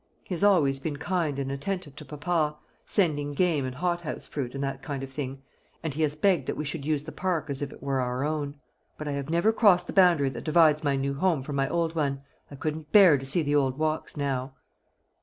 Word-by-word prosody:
"He - - -6
has 180 - +1
always 150 -10 +4
been 145 +1 -4
kind 160 -2 -1
and 135 -1 -2
attentive 150 0 -4
to 150 - -9
papa, 150 0 -1 0.3
sending 145 -7 +1
game 160 -5 +2
and 130 0 -5
hothouse 175 +1 -2
fruit, 135 -3 -5
and 135 - -3
that 135 0 -3
kind 140 -3 -5
of 135 - -7
thing; 135 -1 -5 0.4
and 160 -3 -2
he 155 - -3
has 150 -1 +1
begged 185 +2 +2
that - - -2
we 150 - -3
would 145 -3 -6
use 150 -2 0
the 160 - -8
park 165 -6 -2
as 135 - -3
if 145 - -3
it - - -13
were 135 -1 0
our 125 +1 -2
own; 145 -1 -3 0.4
but 155 - -6
I - - -1
have 140 0 -4
never 170 +7 +3
crossed 190 -6 +4
the - - -6
boundary 175 -8 +5
that 120 -2 -7
divides 155 -1 +4
my 140 -2 +2
new 135 +1 -1
home 155 -1 +1
from 145 +1 -5
my 135 0 +1
old 165 -1 0
one. 140 -4 -1 0.3
I 140 - -9
couldn't 155 +1 -4
bear 190 -7 +8
to 135 - -7
see 155 +5 +2
the 145 0 0
old 135 -3 +2
walks 155 0 -2
now." 135 -2 -2
150 Hz, 235 wpm, -27 LUFS, 140-165 Hz, 0.4 s, bear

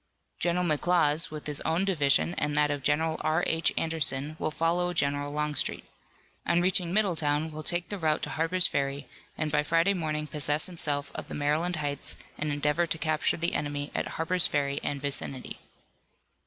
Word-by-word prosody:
General 175 +1 +1
McLaws 160 -1 +2
with 155 -1 -7
his 150 -2 +3
own 170 +4 0
division 160 -3 +2
and 150 0 -1
that 150 0 +3
of 145 -1 -2
General 160 +3 +1
R. 160 +3 +1
H. 160 0 +1
Anderson 155 -2 +1
will - - 0
follow 170 +3 0
General 145 -2 0
Longstreet. 150 -1 -1 0.6
On 170 - +3
reaching 180 -1 +1
Middletown 160 -6 +1
will 155 0 -6
take 175 +3 +1
the 205 - -4
route 155 -2 +1
to - - -3
Harper's 165 +3 +1
Ferry, 140 0 -1 0.3
and 155 -1 -1
by 150 - +3
Friday 165 +6 +2
morning 155 -4 -2
possess 150 +1 +1
himself 145 -5 -1
of - - -6
the - - -6
Maryland 155 +5 0
Heights 145 -2 -3 0.2
and 150 0 -1
endeavor 150 +4 +1
to 165 - -1
capture 155 -1 0
the 170 +1 -1
enemy 145 0 -2
at - - -1
Harper's 175 +2 +1
Ferry 140 -1 0
and 145 - -2
vicinity. 135 -2 -4
155 Hz, 175 wpm, -28 LUFS, 145-170 Hz, 0.6 s, his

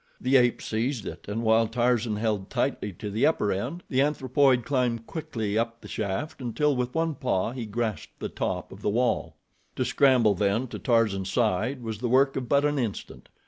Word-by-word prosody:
The 130 +2 +1
ape 120 -2 +4
seized 115 0 -2
it, - - -8
and 110 +3 -3
while 110 0 +4
Tarzan 120 -1 +1
held 105 -3 -1
tightly 105 - -1
to 105 +4 -6
the 110 +4 +3
upper 130 -10 +1
end, 165 - -3
the 130 0 +1
anthropoid 135 -3 +2
climbed 120 -4 0
quickly 115 -10 -3
up 115 0 -2
the - - -12
shaft 110 +8 -3
until 140 +4 +1
with 125 +2 -2
one 165 0 +1
paw 120 -7 -1
he 120 -3 -5
grasped 110 0 -4
the - - -3
top - - -3
of - - -11
the - - 0
wall. 120 +3 0 0.4
To - - 0
scramble 125 -6 +4
then 100 +5 +1
to - - -6
Tarzan's 105 -6 +1
side 120 +3 0
was 110 -2 -4
the 120 0 -2
work 135 +2 +4
of 130 -3 -4
but 140 0 +3
an 145 -1 +1
instant. 115 -5 -5
120 Hz, 195 wpm, -27 LUFS, 110-130 Hz, 0.4 s, ape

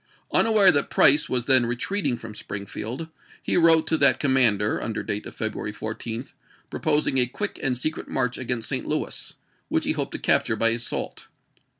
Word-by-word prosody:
Unaware 215 -4 +5
that 145 -1 -1
Price 145 +2 +5
was 125 -2 0
then 130 -3 +5
retreating 130 +3 -2
from 115 -2 -10
Springfield, 105 +9 -7 0.3
he - - -1
wrote 165 -2 +4
to 160 - +1
that 140 -2 +4
commander, 120 -7 +2
under 110 -1 -4
date 105 -1 -4
of - - -12
February 110 -1 -3
14, 115 +3 -6 0.5
proposing 150 -3 0
a 125 - +3
quick 205 - -4
and 125 -2 0
secret 155 +5 -3
march 125 -1 -2
against 125 -3 -1
St. - - -2
Louis, - - -3 0.3
which - - -1
he - - +1
hoped - - -3
to - - -3
capture 110 - +1
by 115 +1 +3
assault. 115 +1 -4
125 Hz, 175 wpm, -24 LUFS, 115-145 Hz, 0.5 s, Unaware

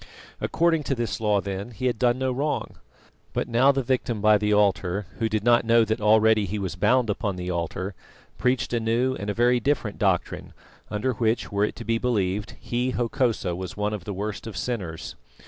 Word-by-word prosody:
According 165 -1 +1
to 135 - 0
this 120 -2 -3
law, 105 -2 +2
then, 100 +2 -5
he 120 +2 -6
had 120 -3 0
done 120 0 +3
no 130 0 0
wrong. 145 +4 -2 0.6
But - - -1
now 125 +4 +4
the 135 -1 -1
victim 120 -3 -1
by 105 0 +5
the 105 0 0
altar, 100 -1 +2
who 115 - +1
did 110 -1 -1
not 120 0 +4
know 115 0 +4
that 110 0 -2
already 110 0 +4
he 105 +4 -3
was 95 -3 -3
bound 125 -1 +3
upon 105 -1 -2
the 90 0 -4
altar, 90 +3 -3 0.5
preached 125 -1 0
a 120 - +2
new 115 +3 +1
and 105 -5 -5
a 100 - -2
very 120 +1 +3
different 120 -5 -1
doctrine 95 -4 0 0.4
under 105 +5 -1
which, 115 0 0
were 100 +1 +2
it - - -5
to 115 - -8
be 115 0 +1
believed, 105 -5 -1
he, 125 +1 -2
Hokosa, 115 -6 0
was 95 +2 -6
one 105 +1 -1
of 100 -4 -5
the 105 - -4
worst 105 +3 -4
of 105 -4 -7
sinners. 95 -7 -4
110 Hz, 205 wpm, -25 LUFS, 100-120 Hz, 0.6 s, by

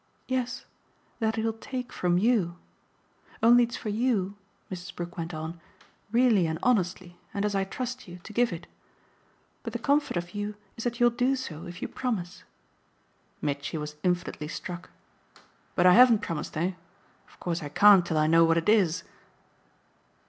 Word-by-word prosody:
"Yes, 250 -2 -2 0.5
that 220 -1 +1
he'll 225 0 0
take 250 +3 -6
from 175 -1 +1
YOU. 190 -5 +2 0.9
Only 240 +1 +7
it's 235 - -6
for 215 - -5
you," 210 -3 0 0.4
Mrs. 180 0 -7
Brook 175 0 -6
went 165 0 -4
on, 160 +1 -6 0.5
"really 230 -7 +4
and 160 0 -2
honestly, 185 -6 0 0.2
and 200 +1 0
as 210 - 0
I 195 -1 +1
trust 250 +4 -5
you, 175 0 -9
to 215 - -10
give 240 +1 +2
it. 170 -1 -6 1.0
But - - -6
the - - -1
comfort 285 -8 +1
of 175 0 -4
you 205 0 -3 0.2
is 230 - -6
that 240 0 -2
you'll 240 0 +5
do 250 +3 +1
so 170 - -6
if 175 +1 -8
you - - -1
promise." 205 -9 -4 1.0
Mitchy 145 +2 -2
was 150 0 -5
infinitely 175 -4 -1
struck. 175 +2 -6 0.9
"But 175 - +3
I 180 - +8
haven't 235 -2 +7
promised, 160 -2 -4
eh? 175 +4 +1 0.6
Of - - -22
course 175 -1 -2
I 145 - -5
can't 200 +4 +7
till 165 -2 -2
I 155 - +4
know 165 +1 +5
what 165 0 +4
it 165 +4 +1
is." 185 -5 +3
190 Hz, 170 wpm, -28 LUFS, 170-235 Hz, 1.0 s, I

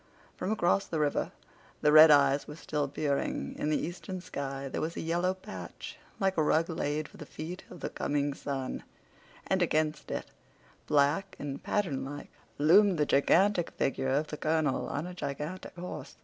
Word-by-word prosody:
From 185 - -3
across 195 -2 +2
the 160 - -2
river 150 -1 0 0.5
the 150 - +4
red 155 +1 +10
eyes 140 -1 +5
were 150 - -7
still 150 -2 -2
peering. 140 0 -2
In 150 - 0
the 155 - +2
eastern 180 +2 -5
sky 140 -6 -5
there - - -3
was 165 +2 -3
a - - -2
yellow 175 +3 0
patch 215 +9 -9 0.2
like 190 -2 +1
a - - +4
rug 160 +3 +2
laid 150 -1 -2
for - - -16
the - - -8
feet 170 +4 -7
of 180 - -11
the - - -2
coming 145 0 -1
sun; 135 -2 -4 0.6
and 190 -1 +1
against 155 -3 0
it, - - -4 0.6
black 150 +5 +2
and 140 -1 -5
patternlike, 145 -7 -2 0.3
loomed 180 +5 +5
the 150 - +2
gigantic 175 +6 +3
figure 135 -1 -1
of 140 +4 +2
the 150 - -7
colonel 155 -3 0
on 145 +3 -3
a 180 - -6
gigantic 150 +3 -5
horse. 180 +1 -7
155 Hz, 175 wpm, -30 LUFS, 145-180 Hz, 0.6 s, red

